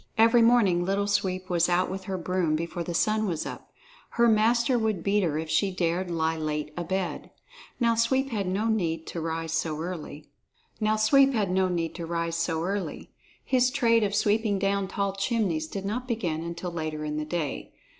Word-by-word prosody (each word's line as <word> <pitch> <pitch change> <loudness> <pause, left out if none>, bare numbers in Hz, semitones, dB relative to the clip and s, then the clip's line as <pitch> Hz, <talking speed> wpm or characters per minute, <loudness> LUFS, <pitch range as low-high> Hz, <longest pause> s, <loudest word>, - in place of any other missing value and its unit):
Every 230 +2 +6
morning 225 -7 +4
Little 195 +2 0
Sweep 185 -2 -1
was 175 -1 +2
out 180 +1 +2
with 190 0 -6
her 190 -1 -3
broom, 175 -2 0
before 170 +2 -3
the 175 - -5
sun 215 +3 +1
was 165 -4 -2
up. - - -8 0.4
Her 235 0 +3
master 235 +3 +3
would 215 -6 -1
beat 205 +1 +2
her 160 -5 0
if 160 +1 -3
she 160 +5 +2
dared 180 0 -1
lie 160 -1 0
late 150 -1 -3
abed. 175 +1 -3 0.5
Now 235 -2 +3
Sweep 260 +4 +1
had 200 -4 -1
no 195 +4 -1
need 170 -8 0
to 170 - -5
rise 165 0 -3
so 160 -1 -1
early. 160 -3 -6 0.5
His 215 0 +1 2.7
trade 230 -4 +3
of 205 0 0
sweeping 210 0 +2
down 195 0 0
tall 200 0 -2
chimneys 195 -6 -1
did 195 +3 -6
not 245 +5 -3
begin 180 -10 -2
until 170 +1 -5
later 155 -2 -4
in 150 0 -3
the 155 - -1
day. 155 -2 -3
185 Hz, 165 wpm, -27 LUFS, 165-215 Hz, 2.7 s, Every